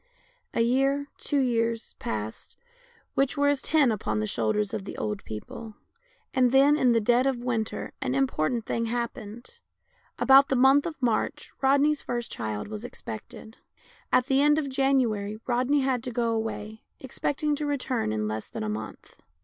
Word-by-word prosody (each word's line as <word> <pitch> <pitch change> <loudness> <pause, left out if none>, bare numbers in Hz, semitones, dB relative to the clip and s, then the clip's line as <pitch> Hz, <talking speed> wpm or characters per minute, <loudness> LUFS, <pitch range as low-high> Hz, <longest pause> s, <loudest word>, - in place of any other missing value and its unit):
A - - +2
year, 270 +4 +1
two 290 - -1
years, 230 -3 0
passed, 110 0 -5 0.6
which 275 0 +1
were 285 0 +3
as 285 -2 +1
ten 295 -6 +3
upon 110 - -2
the 105 - 0
shoulders 155 - 0
of 195 - -3
the 195 - -8
old 210 -2 -3
people, 215 - -8 0.6
and 255 -2 +3
then, 275 +2 +6
in 255 -5 +3
the 230 - +4
dead 240 +4 +3
of 265 -2 +1
winter, 225 -3 -2
an 265 -1 -1
important 240 -4 0
thing 230 - -1
happened. 235 - -5 0.6
About 270 +3 +6
the 270 - +2
month 270 +4 +5
of 320 -3 -7
March 230 -3 -1
Rodney's 280 +2 +3
first 240 -1 -4
child 110 -2 -4
was 215 +1 -6
expected. 220 - -9 0.5
At 250 - +4
the 270 +1 +2
end 295 +1 +4
of 295 -3 -1
January 245 -6 +1
Rodney 255 +4 +2
had 260 -2 0
to 250 - -3
go 235 -1 0
away, 220 -1 -4 0.2
expect 270 +2 -3
ing 300 -1 +2
to 300 0 -2
return 255 - -1
in 105 0 -1
less 110 0 -4
than - - -5
a 105 - -2
month. 110 +1 -7
245 Hz, 175 wpm, -27 LUFS, 215-270 Hz, 0.6 s, then